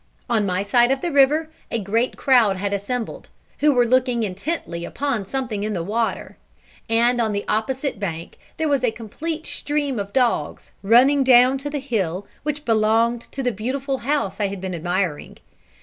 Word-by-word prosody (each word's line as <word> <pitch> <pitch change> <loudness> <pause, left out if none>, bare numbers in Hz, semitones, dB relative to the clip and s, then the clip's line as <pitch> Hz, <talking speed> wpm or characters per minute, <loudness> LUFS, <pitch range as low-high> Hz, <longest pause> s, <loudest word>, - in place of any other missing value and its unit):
On 220 -5 +1
my 185 +1 0
side 240 +4 +3
of 270 0 0
the 345 - -2
river 300 +3 +3 0.2
a - - -1
great 225 +4 -1
crowd 235 -8 +4
had 200 +1 -2
assembled, 225 +4 -4 0.3
who 300 0 +4
were 245 -3 +3
looking 250 -1 +2
intently 190 - -4
upon 240 -3 -2
something 235 -5 -3
in 215 0 -2
the 175 -4 -2
water; 225 +5 -2 0.5
and 235 +2 +3
on 220 -2 0
the 200 0 -3
opposite 255 +3 -1
bank 170 -5 -5 0.2
there 320 - 0
was 280 -3 +1
a 245 - +4
complete 305 +9 -6
stream 290 -5 -2
of 200 0 -5
dogs, 240 - 0
running 255 +7 +5
down 255 +1 +5
to 290 +2 -4
the 290 - -3
hill 205 - -2 0.2
which 295 0 -4
belonged 225 +1 +2
to 270 - -7
the 250 - +1
beautiful 265 +5 -3
house 280 -7 -1
I 205 - +1
had 195 0 -6
been 190 0 -4
admiring. 175 -1 -2
235 Hz, 180 wpm, -22 LUFS, 200-270 Hz, 0.5 s, running